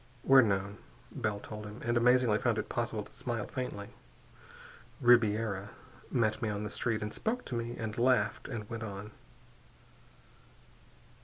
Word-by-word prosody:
_" - - -28 0.2
"We're 135 0 +9
known," 100 -2 0 0.3
Bell 110 -6 -2
told 105 0 -7
him 105 +3 -9
and 120 0 0
amazingly 120 -2 +4
found - - +1
it - - -3
possible - - -2
to - - -16
smile - - -3
faintly 105 -5 -5 1.1
"Ribiera 110 -4 +3 0.4
met 110 0 +1
me 110 - 0
on 105 0 -3
the 105 - -4
street 115 -2 -1
and 105 - -4
spoke 245 +3 -2
to 125 - -4
me 120 +1 -3
and 110 -2 -4
laughed 120 -3 +2
and 110 -6 -5
went 115 0 -5
on." 105 -1 -6
110 Hz, 155 wpm, -32 LUFS, 105-120 Hz, 1.1 s, We're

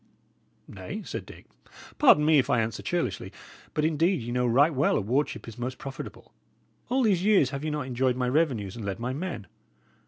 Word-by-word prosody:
"Nay," - - -7
said - - -6
Dick, - - -13 0.5
"pardon 150 - +6
me 155 -1 +5
if 130 - 0
I 120 - +3
answer 110 -1 -2
churlishly; - - -2 0.4
but 150 - +1
indeed 160 0 +1
ye 120 - -5
know 125 0 +1
right 140 +7 +4
well 140 +1 +2
a - - +2
wardship 125 +8 -1
is 115 0 -9
most 125 +2 -4
profitable. 135 -1 -9 0.6
All 260 +2 +2
these 195 -6 +2
years 195 -10 +4
have 140 0 -5
ye 155 - -1
not 150 -3 -2
enjoyed 125 0 0
my 125 0 -1
revenues, 125 - 0
and 115 - -7
led 100 +1 -4
my 125 +2 -2
men? 145 - -5
135 Hz, 195 wpm, -27 LUFS, 120-155 Hz, 0.6 s, pardon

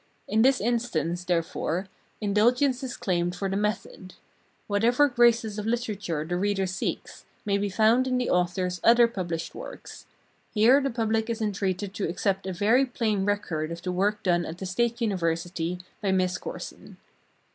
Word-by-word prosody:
In 220 - +2
this 265 +2 +4
instance, 200 -7 -1
therefore, 175 +1 -1 0.3
indulgence 245 +6 +2
is 255 -2 -5
claimed 175 -1 -1
for 195 +2 -2
the 190 - -2
method. 200 -2 -3 0.5
Whatever 235 +7 +3
graces 235 -4 +3
of 210 - -4
literature 205 -9 -2
the 175 +2 -2
reader 195 0 0
seeks, 185 +1 -4 0.2
may 200 -1 +1
be 200 0 -1
found 225 +6 +3
in 255 -1 +1
the 250 - 0
author's 180 0 0
other 235 0 +6
published 175 -7 -4
works; - - -10 0.5
here 240 +7 +6
the 275 - 0
public 225 -1 0
is 230 0 -2
entreated 195 -2 -2
to 200 -4 -2
accept 190 +2 -1
a - - -2
very 215 +8 +3
plain 215 -5 -1
record 165 -6 -1
of 170 +1 -7
the 180 - -2
work 205 +3 0
done 175 -2 +2
at 165 +1 -6
the 190 - -6
State 235 +6 -1
University 175 -3 -1 0.2
by 200 -3 +1
Miss 185 -1 +1
Corson. - - -8
200 Hz, 165 wpm, -26 LUFS, 180-230 Hz, 0.5 s, other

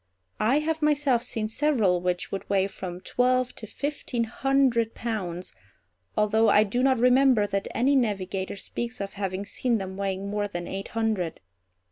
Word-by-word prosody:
I 240 +6 +3
have 320 +1 -1
myself 290 -5 +2
seen 225 -3 -2
several 220 -8 +2
which 180 0 -2
would 195 - -5
weigh 195 -1 +3
from 185 -2 -6
twelve 255 +2 +1
to 220 - -8
fifteen 280 -1 -3
hundred 240 -1 +1
pounds, 185 -7 -4 0.6
although 220 +1 +3
I 210 - +6
do 215 +4 -1
not 265 0 +4
remember 250 -2 +5
that 200 -1 -2
any 270 +4 +2
navigator 195 -6 -1
speaks 235 +4 -5
of 200 0 -4
having 195 -1 -3
seen 240 +2 0
them 190 -1 -6
weighing 195 0 -2
more 205 0 -1
than 175 -3 -5
eight 195 +1 -5
hundred. 215 -7 0
220 Hz, 160 wpm, -26 LUFS, 195-250 Hz, 0.6 s, I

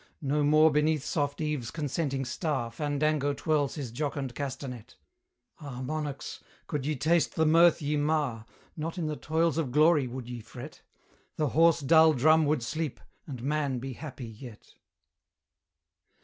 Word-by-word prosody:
No 145 +2 +1
more 155 +2 +5
beneath 150 0 +1
soft 145 -1 -2
Eve's 150 -7 -2
consenting 145 -3 -2
star 130 -2 -2
Fandango 145 +2 0
twirls 145 -1 0
his 135 -7 -5
jocund 140 0 -3
castanet: 130 -3 -6 0.6
Ah, 135 -5 -7
monarchs! 145 0 -5 0.2
could 145 -2 -3
ye 155 - 0
taste 160 +5 +1
the 160 - +2
mirth 165 +1 +5
ye 150 +1 0
mar, 145 -7 -1 0.3
Not 165 +3 -4
in 170 - -2
the 155 0 -2
toils 160 +2 0
of 140 -6 -2
Glory 150 -1 +4
would 125 0 -7
ye 120 -1 -6
fret; 120 +6 -10 0.5
The 150 -2 0
hoarse 165 +2 +4
dull 160 +3 +6
drum 155 +3 +4
would 150 -4 +1
sleep, 155 +2 -3 0.3
and 130 -5 -7
Man 145 -2 0
be 130 +2 -5
happy 130 -2 -8
yet. 115 0 -12
145 Hz, 150 wpm, -29 LUFS, 130-155 Hz, 0.6 s, dull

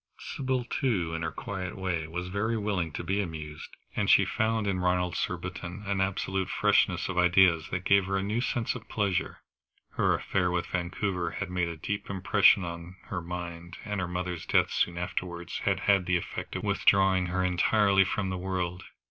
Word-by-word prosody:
Sybil, 130 -2 -2
too, 110 -9 -1
in 80 - -3
her 80 - -1
quiet 95 -2 -5
way, 90 -4 -2
was 90 +2 -4
very 105 +5 -1
willing 100 -6 -1
to - - -4
be 100 +2 0
amused, 80 -4 -6 0.3
and - - 0
she - - +6
found 110 -1 0
in 95 -2 0
Ronald 90 0 +1
Surbiton 90 +2 -4
an 100 -1 0
absolute 95 -1 -1
freshness - - +2
of 95 -1 -1
ideas 90 -2 +4
that 90 - -3
gave 100 -1 +4
her 95 0 0
a 95 - -1
new 105 +4 -1
sense 120 -2 -1
of - - -10
pleasure. 100 -4 -1 0.5
Her - - +2
affair 90 -2 0
with 90 -1 -1
Vancouver 90 0 -2
had 100 -3 -4
made 90 -1 0
a 85 - -6
deep 100 +6 -4
impression 100 0 +4
on 85 +1 -7
her 95 - -3
mind, 85 0 -6
and 105 -1 -2
her 95 - -1
mother's 90 -1 -4
death - - +3
soon 85 -1 0
afterwards 85 0 -4
had - - +1
had 100 -3 +3
the 90 -1 +3
effect 85 - -6
of - - -3
withdrawing 95 -2 +3
her 95 +1 0
entirely 95 +2 +4
from 95 0 -2
the 95 - -3
world. 90 -1 -3
90 Hz, 190 wpm, -29 LUFS, 90-100 Hz, 0.5 s, she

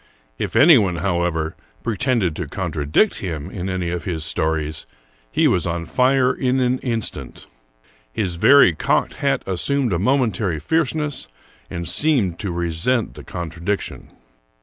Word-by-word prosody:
If - - -3
anyone, 120 - +6
however, 85 -2 -1 0.3
pretended 115 - 0
to - - -4
contradict 75 - 0
him 80 -6 -5
in 95 0 -4
any 90 -2 -2
of 90 -2 -3
his 80 -4 -1
stories, 80 -2 -1 0.4
he - - +3
was 90 - +1
on 85 0 -3
fire 130 +2 +2
in 130 0 0
an 125 0 +1
instant. 115 -4 -4 0.7
His 90 - -2
very 140 -2 +6
cocked 75 - 0
hat - - +1
assumed 120 +6 0
a 85 - 0
momentary 105 - +1
fierceness, 150 - -1 0.4
and 85 -1 -5
seemed 115 - +1
to 105 - -3
resent 85 +8 0
the - - -11
contradiction. 85 +3 -4
95 Hz, 135 wpm, -21 LUFS, 85-125 Hz, 0.7 s, anyone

